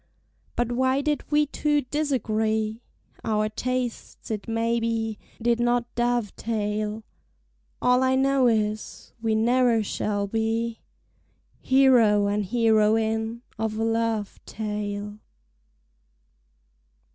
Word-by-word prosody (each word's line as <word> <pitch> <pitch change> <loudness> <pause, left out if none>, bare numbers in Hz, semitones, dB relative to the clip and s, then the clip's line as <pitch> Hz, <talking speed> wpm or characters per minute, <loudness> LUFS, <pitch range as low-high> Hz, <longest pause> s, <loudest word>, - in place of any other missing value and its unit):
—But 240 0 0
why 260 +2 +2
did 295 0 -2
we 300 0 +4
two 295 0 0
disagree? 220 -6 -1 0.4
Our 215 -1 0
tastes, 250 +1 -4
it 210 -2 -4
may 230 +1 0
be, 225 -2 -2 0.2
did 235 0 +1
not 240 0 0
dovetail: 215 -2 -1 0.8
All 250 +1 +4
I 260 0 +3
know 270 -1 +3
is, 215 -2 -2
we 225 -1 +1
ne'er 235 0 +3
shall 205 0 -2
be 225 +2 -1 0.8
Hero 245 -6 +4
and 205 +1 0
heroine 225 +1 +1 0.2
of 220 -1 -2
a 225 - 0
love 225 -2 -1
tale. 210 -1 -4
225 Hz, 100 wpm, -25 LUFS, 215-245 Hz, 0.8 s, we